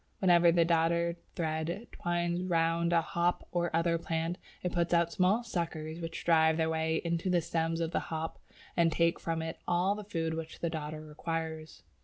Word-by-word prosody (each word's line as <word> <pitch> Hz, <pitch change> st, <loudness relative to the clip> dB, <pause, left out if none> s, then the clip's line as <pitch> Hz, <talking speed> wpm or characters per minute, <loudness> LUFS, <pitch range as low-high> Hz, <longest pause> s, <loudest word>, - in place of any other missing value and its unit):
Wherever 175 Hz, -2 st, +5 dB
the 170 Hz, 0 st, +4 dB
Dodder 170 Hz, 0 st, +2 dB, 0.2 s
thread 160 Hz, +5 st, -2 dB
twines 175 Hz, 0 st, -1 dB
round 165 Hz, 0 st, +2 dB
a 170 Hz, -1 st, +4 dB
hop 170 Hz, +2 st, 0 dB
or 175 Hz, -1 st, 0 dB
other 170 Hz, 0 st, +2 dB
plant, 165 Hz, +2 st, -2 dB, 0.2 s
it 180 Hz, -, -1 dB
puts 170 Hz, 0 st, +1 dB
out 170 Hz, 0 st, +2 dB
small 190 Hz, +7 st, +2 dB
suckers 165 Hz, -6 st, -3 dB
which 165 Hz, 0 st, -5 dB
drive 160 Hz, -1 st, +4 dB
their 160 Hz, 0 st, +1 dB
way 160 Hz, 0 st, 0 dB
into 170 Hz, +2 st, 0 dB
the 180 Hz, -1 st, +4 dB
stem 165 Hz, 0 st, -1 dB
of 165 Hz, -1 st, -1 dB
the -, -, +1 dB
hop 160 Hz, 0 st, -4 dB, 0.4 s
and 170 Hz, -2 st, +4 dB
take 170 Hz, +1 st, +2 dB
from 165 Hz, -1 st, -2 dB
it 160 Hz, +1 st, -5 dB
all 180 Hz, +3 st, +2 dB
the 210 Hz, 0 st, -6 dB
food 165 Hz, -5 st, -2 dB
which 160 Hz, 0 st, -5 dB
the 170 Hz, -, -1 dB
Dodder 155 Hz, -1 st, -4 dB
requires. 160 Hz, 0 st, -5 dB
165 Hz, 185 wpm, -31 LUFS, 160-175 Hz, 0.4 s, Wherever